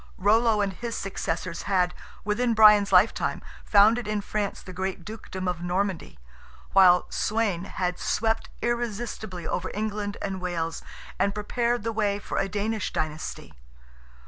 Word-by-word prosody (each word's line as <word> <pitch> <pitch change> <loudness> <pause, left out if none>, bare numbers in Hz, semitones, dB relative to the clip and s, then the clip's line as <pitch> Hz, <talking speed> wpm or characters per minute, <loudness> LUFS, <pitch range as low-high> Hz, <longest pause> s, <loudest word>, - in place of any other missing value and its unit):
Rollo 215 +2 +3
and 195 -1 -1
his 235 +4 -5
successors 175 -2 -3
had, 180 -2 +2 0.3
within 230 +3 +1
Brian's 210 -2 +7
lifetime, 185 +4 +3 0.2
founded 215 +2 +4
in 210 -1 -1
France 205 -1 -3
the 185 - -9
great 185 -1 -4
dukedom 210 -3 -6
of 180 -1 -2
Normandy; 180 - -2 0.6
while 180 -2 +6
Sweyn 210 -5 0
had 180 -2 -3
swept 225 0 0
irresistibly 220 -6 -3
over 180 - -2
England 210 -1 -3
and 190 -2 -4
Wales, 165 -2 -3 0.4
and 200 0 +1
prepared 235 +2 -1
the 225 0 -2
way 205 -2 +1
for 205 - -3
a 195 - 0
Danish 210 +1 -2
dynasty. 155 0 -4
205 Hz, 140 wpm, -26 LUFS, 185-220 Hz, 0.6 s, Brian's